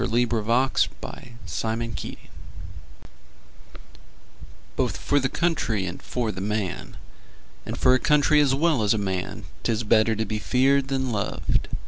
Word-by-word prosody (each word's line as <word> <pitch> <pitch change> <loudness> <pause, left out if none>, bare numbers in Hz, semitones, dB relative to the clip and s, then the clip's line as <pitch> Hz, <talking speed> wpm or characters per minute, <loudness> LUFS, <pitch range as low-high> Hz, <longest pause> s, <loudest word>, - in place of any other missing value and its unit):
Anthony 120 +2 +2
Findlay 115 -1 -2 2.6
Both - - 0
for 145 - +1
the 135 -1 0
country 125 - 0
and 90 -1 -6
for 120 -3 -2
the 95 -1 -6
man, 100 -6 -3 0.7
And - - -4
for 125 - +5
a 130 - +3
country 150 +2 +4
as 135 -2 +3
well 155 -3 +2
as 105 +1 +3
a 100 -2 -1
man, 90 -1 -4 0.2
'Tis 115 -1 0
better 110 0 +3
to 110 +1 -1
be 105 +1 -3
feared 135 +4 +2
than 130 -2 -1
loved. 105 -2 -1
115 Hz, 130 wpm, -25 LUFS, 105-135 Hz, 2.6 s, for